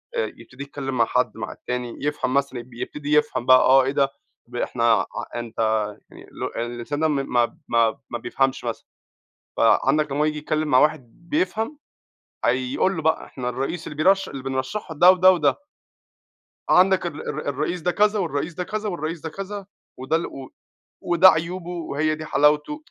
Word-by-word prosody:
آآ 470 - +1
يبتدي 130 +1 -10
يتكلم 135 -2 -5
مع 115 - +4
حد، - - 0
مع - - -5
التاني، 125 -1 -5
يفهم 145 -3 -1
مثلًا 140 -2 0
يب 120 +1 -12
يبتدي 145 +5 -4
يفهم 150 -5 +2
بقى، 130 0 +8
آه 135 +1 +6
إيه 135 - 0
ده 140 -1 +2 0.4
ب 120 - -13
إحنا 120 -1 -2 0.2
ع - - -3 0.3
أنت 120 -2 -6 0.5
يعني - - -14
اللي - - -5
هو - - -2 0.2
الإنسان 120 +4 -5
ده 160 - +3
م 150 - 0 0.2
ما 120 -1 +2
ما 115 -1 +2
ما 120 - -3
بيفهمش 135 +3 -1
مثلًا، 115 -1 -4 0.7
فعندك 150 -2 +3
لمّا 145 - -1
هو - - +4
ييجي 155 0 -1
يتكلم 155 +1 -1
مع 130 - +5
واحد 150 +2 0
بيفهم 220 +10 -1 0.7
هيقول 130 +9 +1
له 160 - -3
بقى 160 +1 +1
إحنا 125 -2 -5
الرئيس 135 +7 -4
اللي 150 - -7
بيرش 195 +5 +3
اللي 135 -2 -7
بنرشحه 135 +7 -4
ده 175 +5 +8
وده 185 0 +6
وده. 150 -6 +1 1.1
عندك 185 0 +4
ال 160 -3 -5
الر 150 - -4
الرئيس 170 +6 -2
ده 180 - +1
كذا 210 +3 +2
والرئيس 160 -2 -2
ده 180 - -3
كذا 215 +3 -3
والرئيس 165 -2 -4
ده 160 - -5
كذا، 195 +3 -6 0.3
وده 130 +5 -1
ال 165 - 0
و 135 -1 -9 0.5
وده 175 +2 +6
عيوبه 175 +1 -2
وهي 155 -3 -1
دي 155 0 -7
حلاوته 150 - +2
150 Hz, 185 wpm, -23 LUFS, 130-175 Hz, 1.1 s, بقى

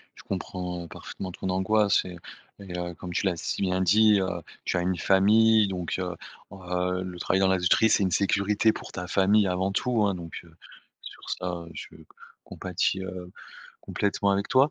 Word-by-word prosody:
Je - - -14
comprends 90 -2 -5
parfaitement 95 +2 -8
ton 95 - -5
angoisse 100 +3 +2
et 90 -1 -8 0.4
et 95 -3 -7
heu, 90 0 -4
comme 90 +1 -8
tu 100 - -1
l'as 90 -3 +1
si - - -3
bien 95 0 +1
dit, 105 +3 +5
heu, 95 - 0 0.4
tu - - -1
as 90 - +1
une 90 0 0
famille 110 +2 +4
donc 90 -3 -3
heu, 90 -1 -3 0.4
heu, 90 -1 -2
le 90 -1 -7
travail 95 - +1
dans 95 - +4
l'industrie 95 +4 +3
c'est 105 - +3
une 95 - +1
sécurité 100 +4 +2
pour - - -9
ta 90 0 -6
famille 100 +2 +3
avant 95 +1 0
tout 115 +1 +1
hein, 100 - 0
donc 85 -2 -8
heu, 85 -2 -19 0.5
sur - - -10
ça, 90 - -3 0.2
heu, 85 - -12
je 75 - -9
c - - -15 0.4
compatis, 95 +1 -2
heu, 90 -1 -7 0.5
complètement 100 -1 0
avec 100 +1 -1
toi 135 +3 +4
95 Hz, 190 wpm, -26 LUFS, 90-100 Hz, 0.5 s, dit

